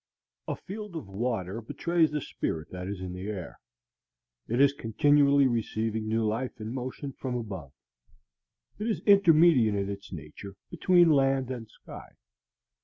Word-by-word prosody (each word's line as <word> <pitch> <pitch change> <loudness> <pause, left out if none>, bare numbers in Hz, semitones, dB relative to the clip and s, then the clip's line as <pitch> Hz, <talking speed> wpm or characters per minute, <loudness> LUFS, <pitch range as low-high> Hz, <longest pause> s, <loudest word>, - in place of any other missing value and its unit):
A - - -2
field 205 -1 -8
of 155 -11 -6
water 100 0 -3
betrays 165 +7 +1
the 150 -1 -3
spirit 80 - -4
that 90 0 -6
is 100 -1 -5
in 90 -1 -5
the 90 +2 -6
air. 95 -5 -6 0.9
It 120 +3 -1
is 140 0 +5
continually 140 +2 +3
receiving 110 -2 -1
new 110 +1 +1
life 115 +4 -2
and 110 +2 -5
motion 130 +2 -5
from 125 -1 -4
above. 95 - -6 1.1
It 215 - -2
is 225 - -1
intermediate 165 - +5
in 100 0 -1
its 100 +1 -9
nature 90 +4 -9 0.2
between 175 0 +4
land 135 -2 +2
and 115 -4 -6
sky. - - -13
120 Hz, 150 wpm, -28 LUFS, 100-145 Hz, 1.1 s, is